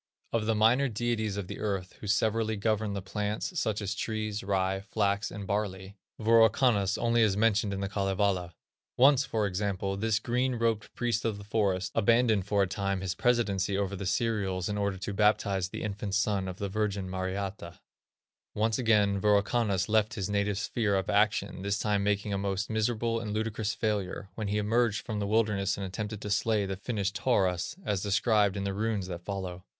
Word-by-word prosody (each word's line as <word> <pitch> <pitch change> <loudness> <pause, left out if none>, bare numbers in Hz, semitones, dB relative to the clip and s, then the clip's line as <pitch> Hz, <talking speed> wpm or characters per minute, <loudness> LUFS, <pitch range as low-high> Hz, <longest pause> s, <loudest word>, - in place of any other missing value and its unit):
Of 110 -2 0
the 115 - +2
minor 120 +6 +4
deities 110 -2 -1
of 100 - -3
the - - -7
earth, 95 -3 -2
who 105 - -7
severally 110 +2 +1
govern 110 0 0
the 100 -2 -4
plants, 105 - -3
such 110 -4 -1
as 100 +1 -2
trees, 110 0 -3
rye, 95 -1 0
flax, 100 0 0
and 100 -1 -7
barley, 100 -1 -3 0.2
Wirokannas 110 -2 +4
only 120 0 +2
is 105 -3 +3
mentioned 105 -1 +2
in 100 0 -3
The 100 - -1
Kalevala. 95 -3 0 0.4
Once, 135 +1 +6
for 110 -2 0
example, 95 0 -2
this 110 +2 +1
"green 125 +3 0
robed 115 -3 -1
Priest 120 -2 0
of 110 -3 -1
the 100 - -9
Forest" 100 -3 0
abandoned 115 -3 +3
for 100 -1 +3
a - - 0
time 100 +1 -2
his 95 -2 -2
presidency 100 -4 +1
over 100 -1 -1
the 95 0 -4
cereals 100 -5 0
in 105 - -2
order 100 -1 -1
to 95 +2 -4
baptize 100 -3 +2
the - - -6
infant 100 -1 -3
son 100 -2 +1
of 90 -1 -6
the 100 - -3
Virgin 100 -1 -2
Mariatta. 95 -1 -4 0.8
Once 110 +2 +1
again 105 -4 +3
Wirokannas 105 -1 +2
left 110 +1 +2
his 100 -3 -3
native 100 -1 0
sphere 105 -1 0
of 95 - 0
action, 105 -2 +1
this 100 +1 0
time 105 -1 0
making 100 0 0
a 100 - -1
most 100 +1 -2
miserable 115 +1 0
and 110 -2 -4
ludicrous 110 0 -2
failure, 100 -3 -2
when 105 +1 -4
he 105 +1 0
emerged 105 0 +1
from 110 -3 -3
the 100 - -1
wilderness 105 -3 +1
and 100 - -3
attempted 105 +2 -5
to 105 - -4
slay 105 0 +1
the 95 0 -3
Finnish 100 -1 -2
Taurus, 95 - 0
as 100 -3 0
described 105 -1 +2
in 100 - -2
the 100 -1 -2
runes 105 -1 -1
that 90 -2 -6
follow. 95 -2 -5
105 Hz, 190 wpm, -29 LUFS, 100-110 Hz, 0.8 s, Once